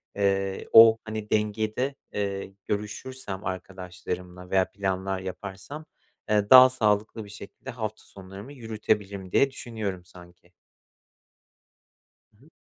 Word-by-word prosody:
eee, 95 -1 0
o, 115 0 +10
hani, 110 -1 -6
dengede, 110 +5 0 0.2
eee, 100 -1 -3
görüşürsem 105 0 -4
arkadaşlarımla 90 -1 -6
veya 95 -1 +2
planlar 95 -1 -2
yaparsam, 95 +10 -7 0.4
eee, 105 -1 +2
daha 130 0 +11
sağlıklı 110 -2 0
bir 100 - -13
şekilde 100 -1 -10
hafta 110 -2 -5
sonlarımı 95 +7 -11
yürütebilirim 105 -5 -2
diye 135 0 +4
düşünüyorum, 105 -8 -5
sanki. 90 0 -17 1.9
Hı 130 - -22
hı. - - -22
100 Hz, 110 wpm, -26 LUFS, 95-110 Hz, 1.9 s, daha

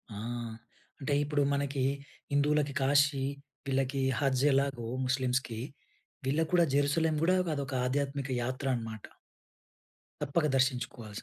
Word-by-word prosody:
ఆ! - - -6 0.8
అంటే, 145 0 -1
ఇప్పుడు 145 0 0
మనకి 140 -1 0 0.5
హిందువులకి 145 0 +2
కాశీ, 140 0 +3 0.4
వీళ్ళకి 135 0 0 0.2
హజ్ 135 -2 +2
ఎలాగో 135 -4 +1 0.2
ముస్లిమ్స్‌కి 130 -3 0 0.7
వీళ్ళకి 155 +4 +1
కూడా 175 -1 +6
జెరుసలేం 155 +3 +2
కూడా 185 +3 +4 0.2
అదొక 140 -2 -4
ఆధ్యాత్మిక 140 +1 -1
యాత్ర 130 +3 -3
అన్నమాట. 110 -3 -6 1.2
తప్పక 150 +3 +1
దర్శించుకోవాల్సింది. 125 -5 -1
140 Hz, 105 wpm, -31 LUFS, 130-145 Hz, 1.2 s, కూడా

